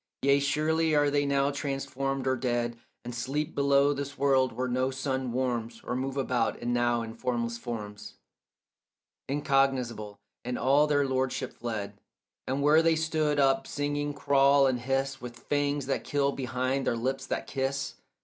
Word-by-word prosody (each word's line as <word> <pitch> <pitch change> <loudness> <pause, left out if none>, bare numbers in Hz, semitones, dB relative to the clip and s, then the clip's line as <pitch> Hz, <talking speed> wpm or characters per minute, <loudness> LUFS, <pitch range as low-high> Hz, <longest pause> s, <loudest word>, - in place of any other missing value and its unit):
Yea, 140 +1 +5
surely 155 +3 +1
are 145 -1 +3
they 145 0 +1
now 140 0 +2
transformed 135 -1 -3
or 130 0 +2
dead, 120 -1 -1 0.3
And 120 - -5
sleep 140 +6 -2
below 140 0 +3
this 140 0 -5
world, 135 -2 +3
where 130 0 -2
no 130 +1 0
sun 130 -1 -2
warms, 120 -2 -2
Or 125 - -3
move 135 +2 -3
about 125 -4 0
it 120 - -5
now 120 -1 +1
in 115 0 -7
formless 115 -1 -2
forms 105 -4 -7 1.1
Incognizable, 135 -7 0 0.3
and 125 0 -3
all 140 +3 +4
their 145 -1 +2
lordship 130 -1 -1
fled; 110 -4 -5 0.5
And 135 +2 -1
where 150 +2 +6
they 165 0 +3
stood 155 -2 0
up 135 -1 +3
singing 145 0 -2
crawl 140 -1 +4
and 130 -2 +1
hiss, 135 +2 -1
With 120 -1 -8
fangs 145 -1 -1
that 135 - -1
kill 140 -1 +1
behind 130 0 -2
their 115 - +1
lips 135 +3 -2
that - - -2
kiss. 135 0 -2
135 Hz, 160 wpm, -28 LUFS, 125-140 Hz, 1.1 s, where